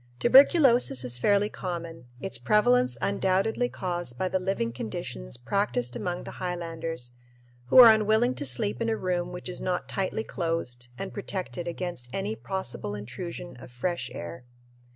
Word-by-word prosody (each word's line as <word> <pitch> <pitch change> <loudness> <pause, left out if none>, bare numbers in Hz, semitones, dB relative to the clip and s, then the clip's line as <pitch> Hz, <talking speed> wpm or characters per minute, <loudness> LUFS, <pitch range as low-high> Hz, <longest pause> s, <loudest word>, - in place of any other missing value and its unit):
Tuberculosis 250 - +6
is 120 -1 -2
fairly 205 +7 +3
common, 170 -7 -6
its 195 - -3
prevalence 125 - +3
undoubtedly 200 +5 +1
caused 175 -9 -4
by 185 - 0
the 185 - 0
living 180 -11 -1
conditions - - -6
practiced 120 - -1
among 175 +7 -3
the - - -7
highlanders, 165 -7 -4 0.6
who - - +3
are 235 -3 +11
unwilling 220 +3 +2
to 145 - -4
sleep 120 -3 0
in 230 - +1
a 220 - 0
room 180 -2 -1
which 180 +1 -7
is 180 - -5
not 185 -1 -2
tightly 195 +3 -2
closed 165 - -3
and 195 - -5
protected 185 -3 -4
against 170 -7 -4
any 200 +7 -2
possible 190 - -4
intrusion 170 - -7
of 130 - -11
fresh 170 +9 -3
air. 85 +8 -7
175 Hz, 150 wpm, -27 LUFS, 125-195 Hz, 0.6 s, are